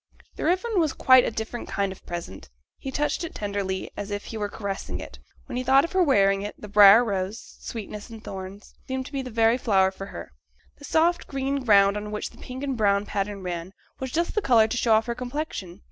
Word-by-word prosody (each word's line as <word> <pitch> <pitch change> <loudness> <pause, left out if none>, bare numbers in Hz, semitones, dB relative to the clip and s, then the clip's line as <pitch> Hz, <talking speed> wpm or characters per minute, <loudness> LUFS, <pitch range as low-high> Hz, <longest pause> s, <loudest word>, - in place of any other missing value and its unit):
This - - -5
ribbon 375 +5 +1
was 315 -4 +1
quite 255 -1 +6
a - - 0
different 225 +2 -5
kind 200 -1 -1
of 190 - -12
present; 95 - -7 0.3
he 270 - -5
touched 295 +5 -1
it 335 - -6
tenderly, 200 -2 -3
as 205 0 -5
if 205 0 -4
he - - -7
were 205 -1 -2
caressing 195 - -5
it, 60 -8 -10 0.3
when - - -5
he 255 - -1
thought 270 +3 +5
of 335 - -8
her 375 - +2
wearing 195 - +3
it; 205 +1 -6
the 210 - -8
briar 205 +3 +8
rose 200 +1 -4
(sweetness 210 -1 -7
and 225 -1 -11
thorns) 195 +1 -8
seemed 260 0 -3
to - - -10
be 275 -2 -2
the 255 - -7
very 230 +1 +3
flower 190 -5 +3
for 195 +1 -8
her; - - -9 0.5
the 285 - -10
soft, 335 +3 +2
green 275 0 -2
ground 200 -3 +5
on 210 0 -5
which 210 0 -4
the - - -18
pink 255 +2 -7
and 275 -2 -1
brown 200 -2 +2
pattern 200 -1 -3
ran, 175 +1 -5 0.3
was 260 -1 -4
just 340 +4 0
the 425 - +1
colour 230 - +5
to 225 - -3
show 230 -2 +3
off 220 +1 +3
her 235 - -2
complexion. 250 - -5
220 Hz, 230 wpm, -25 LUFS, 200-265 Hz, 0.5 s, briar